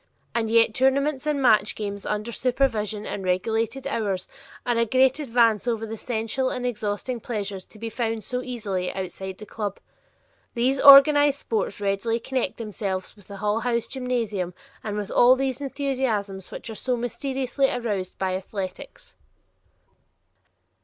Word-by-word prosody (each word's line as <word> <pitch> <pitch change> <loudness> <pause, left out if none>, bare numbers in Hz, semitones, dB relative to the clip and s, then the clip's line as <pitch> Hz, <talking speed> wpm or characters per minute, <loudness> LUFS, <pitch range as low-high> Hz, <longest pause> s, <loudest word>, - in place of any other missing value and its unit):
And 230 -2 0
yet 230 -1 +4
tournaments 270 +3 +1
and 295 -2 +1
match 215 -4 +4
games 200 -1 -5
under 210 +2 -2
supervision 225 -5 0
and 195 - -4
regulated 225 +7 -1
hours 195 -4 -2 0.4
are 240 - +1
a 230 - +3
great 260 +4 +3
advance 230 -5 +2
over 225 -2 0
the 225 0 -5
sensual 230 +3 -2
and 250 0 -3
exhausting 235 +1 -2
pleasures 205 -5 -4
to - - -17
be 225 +2 -5
found 225 -1 -2
so 250 +5 -2
easily 210 -8 -3
outside 190 0 -5
the 210 - -10
club. 205 -2 -4 0.8
These 260 +3 +1
organized 285 0 +8
sports 215 -3 -2
readily 205 +3 0
connect 260 +2 -2
themselves 200 -4 -4
with 205 -3 -18
the 200 - -8
Hull 210 +2 0
House 235 0 0
gymnasium 230 -9 -2 0.3
and 210 -1 -3
with 205 -1 -4
all 250 +1 +6
those 265 0 -2
enthusiasms 255 -9 -2
which 230 - -7
are - - -5
so 250 +3 -1
mysteriously 265 +2 -1
aroused 205 -6 -3
by 185 -1 -1
athletics. 190 0 -6
225 Hz, 150 wpm, -25 LUFS, 205-255 Hz, 0.8 s, organized